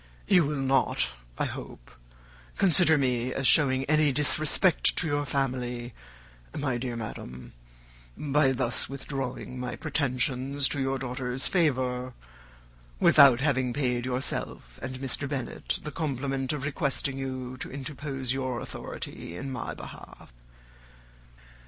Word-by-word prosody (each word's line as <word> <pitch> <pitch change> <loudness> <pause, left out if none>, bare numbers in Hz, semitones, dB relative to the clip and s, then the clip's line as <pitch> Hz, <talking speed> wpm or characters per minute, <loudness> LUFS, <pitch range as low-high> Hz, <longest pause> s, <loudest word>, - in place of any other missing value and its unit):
You 180 -5 +5
will 150 +1 -1
not, 135 -1 +1 0.3
I - - 0
hope, - - -8 0.7
consider 175 -4 +7
me 125 -2 0
as 135 - -1
showing 130 -1 +5
any 150 +1 +3
disrespect 150 +5 +3
to - - +1
your 145 -1 0
family, 125 -3 -2 0.6
my 130 -4 -1
dear 125 -1 -3
madam, 65 - -7 0.6
by 145 -2 +2
thus 125 -3 0
withdrawing 135 -2 -5
my 125 0 -4
pretensions 135 -2 0
to 145 - -1
your 135 0 0
daughter's 125 0 -3
favour, 130 -7 0 0.9
without 130 -3 +7
having 130 -4 +1
paid 125 -3 0
yourself 125 - -3
and 130 0 -4
Mr. 135 +1 -1
Bennet 135 -4 -3
the 150 - -5
compliment 135 -3 -2
of 150 -4 -3
requesting 140 -2 -1
you 130 -1 -4
to - - -6
interpose 135 -1 -3
your 130 -2 -2
authority 85 -5 -7
in 135 +5 -5
my 125 -3 -4
behalf. - - -11
135 Hz, 125 wpm, -28 LUFS, 125-145 Hz, 0.9 s, consider